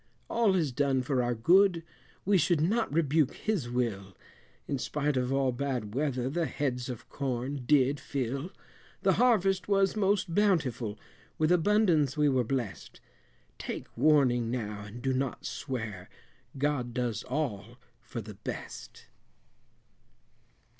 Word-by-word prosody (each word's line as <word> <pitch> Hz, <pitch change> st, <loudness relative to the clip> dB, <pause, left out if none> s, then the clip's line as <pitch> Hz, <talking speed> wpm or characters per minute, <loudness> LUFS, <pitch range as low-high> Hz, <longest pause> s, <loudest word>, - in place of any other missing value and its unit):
All 225 Hz, -5 st, +3 dB
is 160 Hz, -7 st, +1 dB
done 135 Hz, 0 st, +1 dB
for 130 Hz, 0 st, +1 dB
our 120 Hz, 0 st, 0 dB
good, 175 Hz, -, +4 dB, 0.4 s
we 195 Hz, 0 st, +4 dB
should 160 Hz, +1 st, +2 dB
not 210 Hz, +7 st, +1 dB
rebuke 150 Hz, -2 st, +2 dB
His 190 Hz, -, -2 dB
will, 105 Hz, -6 st, -2 dB, 0.5 s
In 140 Hz, -, -2 dB
spite 150 Hz, +2 st, -1 dB
of 125 Hz, 0 st, 0 dB
all 135 Hz, -1 st, +2 dB
bad 125 Hz, -5 st, -3 dB
weather, 130 Hz, -2 st, -1 dB
the 160 Hz, +4 st, -1 dB
heads 125 Hz, -2 st, -2 dB
of 125 Hz, -3 st, -7 dB
corn 130 Hz, 0 st, -3 dB
did 140 Hz, 0 st, +4 dB
fill; 135 Hz, +4 st, -3 dB, 0.5 s
The -, -, +4 dB
harvest 195 Hz, -6 st, +3 dB
was 195 Hz, -1 st, +2 dB
most 200 Hz, -3 st, +1 dB
bountiful, 150 Hz, -, +1 dB, 0.4 s
with 155 Hz, +1 st, +2 dB
abundance 175 Hz, -, +3 dB
we 150 Hz, -1 st, +4 dB
were 130 Hz, -2 st, +2 dB
blest. 115 Hz, -, -4 dB, 0.6 s
Take -, -, -6 dB
warning 125 Hz, -6 st, +3 dB
now 105 Hz, -4 st, -4 dB
and 115 Hz, +4 st, -10 dB
do 135 Hz, -1 st, +1 dB
not 130 Hz, -1 st, -2 dB
swear, 110 Hz, -9 st, -5 dB, 0.5 s
God 135 Hz, -4 st, -1 dB
does 120 Hz, -3 st, -1 dB
all 120 Hz, -5 st, -3 dB, 0.2 s
for 120 Hz, -1 st, -6 dB
the 105 Hz, 0 st, -9 dB
best. 100 Hz, +1 st, -8 dB
135 Hz, 135 wpm, -29 LUFS, 120-160 Hz, 0.6 s, good